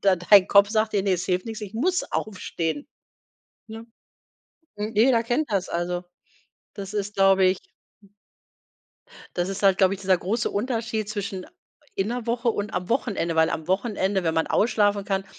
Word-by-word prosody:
d 195 Hz, -2 st, +3 dB
dein 200 Hz, -3 st, +8 dB
Kopf 200 Hz, 0 st, +6 dB
sagt 215 Hz, 0 st, 0 dB
dir: 200 Hz, -, +1 dB
„Ne, 195 Hz, -1 st, +1 dB
es 180 Hz, -, -3 dB
hilft 180 Hz, +1 st, -1 dB
nix, 225 Hz, -1 st, -6 dB
ich 205 Hz, -1 st, -7 dB
muss 355 Hz, +11 st, +1 dB
aufstehen“, 200 Hz, -, -3 dB, 0.8 s
ne? 225 Hz, +1 st, -9 dB, 0.9 s
Jeder 225 Hz, +3 st, +2 dB
kennt 240 Hz, +3 st, -1 dB
das, 195 Hz, -2 st, 0 dB
also, 175 Hz, +1 st, -2 dB, 0.7 s
das 200 Hz, 0 st, -7 dB
ist, 205 Hz, 0 st, -3 dB
glaube 195 Hz, -1 st, +4 dB
ich 185 Hz, +1 st, +2 dB, 1.8 s
Das 175 Hz, +1 st, 0 dB
ist 195 Hz, +1 st, -5 dB
halt, 195 Hz, -1 st, +4 dB
glaube 190 Hz, -1 st, +4 dB
ich, 195 Hz, -, -11 dB
dieser 190 Hz, -1 st, +2 dB
große 210 Hz, +6 st, -1 dB
Unterschied 225 Hz, -1 st, -2 dB
zwischen 200 Hz, -3 st, -5 dB, 0.5 s
in 195 Hz, +2 st, -1 dB
'ner 240 Hz, 0 st, -4 dB
Woche 235 Hz, 0 st, 0 dB
und 210 Hz, -1 st, -2 dB
am 180 Hz, +1 st, -3 dB
Wochenende, 200 Hz, -9 st, -1 dB
weil 160 Hz, 0 st, +4 dB
am 160 Hz, +1 st, -4 dB
Wochenende, 195 Hz, -1 st, 0 dB
wenn 160 Hz, -1 st, 0 dB
man 160 Hz, -, +1 dB
ausschlafen 205 Hz, -2 st, +2 dB
kann, 195 Hz, -1 st, -1 dB
200 Hz, 170 wpm, -24 LUFS, 190-220 Hz, 1.8 s, dein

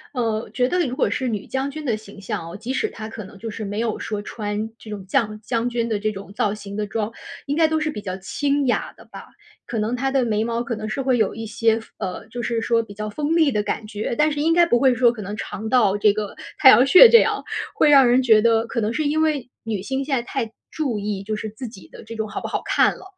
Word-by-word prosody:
呃， 225 Hz, -2 st, -1 dB
觉 250 Hz, 0 st, +1 dB
得 360 Hz, -, +1 dB
如 250 Hz, -, -4 dB
果 -, -, +1 dB
是 260 Hz, -, -2 dB
女 210 Hz, -4 st, -3 dB
将 265 Hz, +1 st, -2 dB
军 310 Hz, +2 st, -7 dB
的 235 Hz, -6 st, 0 dB
形 205 Hz, -1 st, -13 dB
象 165 Hz, -3 st, -4 dB
啊， -, -, -8 dB
即 230 Hz, +5 st, -5 dB
使 435 Hz, +11 st, 0 dB
她 220 Hz, 0 st, -8 dB
可 220 Hz, -2 st, -8 dB
能 190 Hz, +1 st, -13 dB
就 225 Hz, +2 st, -6 dB
是 215 Hz, 0 st, -6 dB
没 205 Hz, +2 st, -4 dB
有 225 Hz, -2 st, -1 dB
说 210 Hz, -1 st, -4 dB
穿 210 Hz, +1 st, -4 dB
这 220 Hz, -, -12 dB
种 200 Hz, -3 st, -6 dB
将 215 Hz, -1 st, -1 dB
将 230 Hz, +1 st, -1 dB
军 235 Hz, -1 st, -1 dB
的 210 Hz, -2 st, 0 dB
这 215 Hz, +1 st, 0 dB
种 195 Hz, 0 st, -9 dB
造 205 Hz, -1 st, 0 dB
型 200 Hz, -1 st, -8 dB
的 210 Hz, -1 st, -2 dB
装， 220 Hz, +1 st, -2 dB, 0.4 s
应 285 Hz, -, 0 dB
该 320 Hz, -1 st, +5 dB
都 315 Hz, 0 st, 0 dB
是 310 Hz, -, 0 dB
比 210 Hz, -, -6 dB
较 185 Hz, -2 st, -4 dB
清 280 Hz, +9 st, -1 dB
雅 245 Hz, -, 0 dB
的 -, -, -17 dB
吧， -, -, -12 dB, 0.4 s
可 235 Hz, -, -4 dB
能 215 Hz, +3 st, -1 dB
她 270 Hz, +2 st, 0 dB
的 270 Hz, -2 st, +2 dB
眉 220 Hz, -1 st, 0 dB
毛 235 Hz, 0 st, -1 dB
可 235 Hz, -, -4 dB
能 215 Hz, 0 st, -5 dB
是 245 Hz, +6 st, -3 dB
会 260 Hz, -2 st, +2 dB
有 220 Hz, -, +1 dB
一 225 Hz, 0 st, -5 dB
些 225 Hz, 0 st, +1 dB
锋 -, -, -18 dB
呃， 190 Hz, -3 st, -5 dB
就 240 Hz, -, -5 dB
是 230 Hz, -1 st, -1 dB
说 230 Hz, 0 st, +2 dB
比 205 Hz, -3 st, -11 dB
较 215 Hz, +1 st, -5 dB
锋 300 Hz, +7 st, -1 dB
利 315 Hz, -4 st, +4 dB
的 210 Hz, -3 st, +1 dB
感 215 Hz, -, -3 dB
觉。 215 Hz, +2 st, -3 dB
但 300 Hz, 0 st, +3 dB
是 290 Hz, -, -3 dB
应 325 Hz, +2 st, +3 dB
该 345 Hz, 0 st, +5 dB
不 240 Hz, -7 st, +2 dB
会 260 Hz, -1 st, +4 dB
说 240 Hz, -1 st, +4 dB
可 225 Hz, -3 st, -8 dB
能 205 Hz, +1 st, -5 dB
长 215 Hz, +1 st, -6 dB
到 220 Hz, -5 st, +3 dB
这 205 Hz, 0 st, +4 dB
个 210 Hz, -1 st, -5 dB, 0.2 s
太 265 Hz, -, +9 dB
阳 260 Hz, +1 st, +7 dB
穴 410 Hz, -, +10 dB
这 465 Hz, -, +9 dB
样， -, -, 0 dB, 0.3 s
会 295 Hz, -, +4 dB
让 275 Hz, -3 st, +7 dB
人 250 Hz, +2 st, +4 dB
觉 220 Hz, -3 st, +6 dB
得 230 Hz, 0 st, +3 dB
可 235 Hz, -, -2 dB
能 220 Hz, +1 st, -1 dB
是 310 Hz, -, -1 dB
因 310 Hz, +2 st, +1 dB
为 290 Hz, -6 st, 0 dB
女 215 Hz, -4 st, -3 dB
性 265 Hz, +5 st, -3 dB
现 280 Hz, -2 st, 0 dB
在 240 Hz, -, 0 dB
太 235 Hz, -2 st, -3 dB, 0.2 s
注 275 Hz, -8 st, -2 dB
意 205 Hz, -1 st, -3 dB
就 215 Hz, +2 st, -3 dB
是 215 Hz, 0 st, -5 dB
自 235 Hz, +4 st, -8 dB
己 215 Hz, -4 st, -13 dB
的 -, -, -13 dB
这 230 Hz, +1 st, -8 dB
种 220 Hz, -1 st, -3 dB
好 -, -, -4 dB
不 -, -, -5 dB
好 -, -, -2 dB
看 -, -, +3 dB
了， -, -, -13 dB
230 Hz, 305 characters per minute, -22 LUFS, 210-265 Hz, 0.4 s, 穴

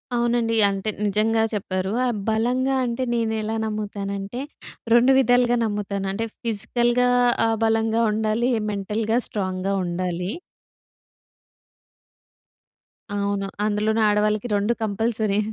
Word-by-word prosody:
అవునండి. 235 Hz, -1 st, +1 dB
అంటే 195 Hz, +2 st, -2 dB, 0.2 s
నిజంగా 220 Hz, +2 st, +2 dB
చెప్పారు. 190 Hz, -1 st, -2 dB
ఆహ్, 240 Hz, -3 st, 0 dB
బలంగా 250 Hz, +4 st, +1 dB
అంటే 235 Hz, +1 st, -2 dB
నేనేలా 220 Hz, -1 st, -1 dB
నమ్ముతానంటే, 205 Hz, +1 st, -4 dB, 0.5 s
2 245 Hz, +3 st, +6 dB
విధాలుగా 245 Hz, -1 st, +3 dB
నమ్ముతాను. 205 Hz, -2 st, -3 dB
అంటే 225 Hz, +3 st, -2 dB, 0.2 s
ఫిజికల్‌గా 240 Hz, +2 st, +1 dB, 0.4 s
ఆహ్, 225 Hz, 0 st, 0 dB
బలంగా 225 Hz, 0 st, +1 dB
ఉండాలి. 220 Hz, +3 st, 0 dB, 0.2 s
మెంటల్‌గా 215 Hz, +3 st, -1 dB
స్ట్రాంగ్‌గా 190 Hz, -1 st, -2 dB
ఉండాలి. 180 Hz, +2 st, -3 dB, 2.8 s
అవును. 200 Hz, -1 st, -1 dB, 0.2 s
అందులోను 215 Hz, +1 st, +1 dB
ఆడవాళ్ళకి 210 Hz, +2 st, +1 dB
2 205 Hz, +4 st, +1 dB
కంపల్సరీ. 215 Hz, -1 st, 0 dB
215 Hz, 95 wpm, -23 LUFS, 200-235 Hz, 2.8 s, 2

